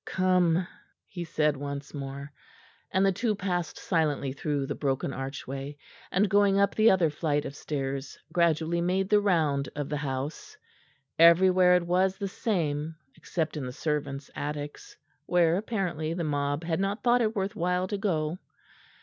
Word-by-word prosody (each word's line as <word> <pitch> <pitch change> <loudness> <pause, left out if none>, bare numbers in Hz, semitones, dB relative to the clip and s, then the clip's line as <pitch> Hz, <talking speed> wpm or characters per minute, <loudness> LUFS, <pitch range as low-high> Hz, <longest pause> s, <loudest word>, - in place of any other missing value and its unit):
"Come," 180 -2 +2 0.4
he 175 -2 -6
said 150 -2 +1
once 140 0 -6
more; 140 0 -6 0.6
and 190 +1 +2
the 195 - +4
two 215 +3 0
passed 180 -4 -2
silently 150 -6 0
through 140 0 -2
the - - -3
broken 135 -1 -1
archway, 135 +1 -6 0.3
and 200 +3 +3
going 200 0 +4
up 200 0 +3
the 220 +1 +5
other 175 -5 +3
flight 150 -1 -1
of 140 - -6
stairs, 135 -2 -4 0.2
gradually 170 0 +2
made 185 +2 0
the 210 -1 +5
round 155 -8 +1
of 145 -2 -3
the 150 - -1
house. 140 +1 -4 0.6
Everywhere 180 +2 +6
it 180 -1 +1
was 185 +2 +2
the 200 - -3
same, 160 - -2 0.2
except 160 -2 -3
in 150 - -3
the - - -5
servants' 145 -1 -3
attics, 145 0 -6 0.3
where, 170 -2 +3
apparently, 180 -6 -2
the 170 - -2
mob 145 0 -1
had 165 0 -1
not 200 +2 -1
thought 245 0 +4
it 220 0 0
worth 200 +2 -2
while 180 -1 0
to 205 - -2
go. 170 -4 -1
165 Hz, 160 wpm, -28 LUFS, 145-185 Hz, 0.6 s, Everywhere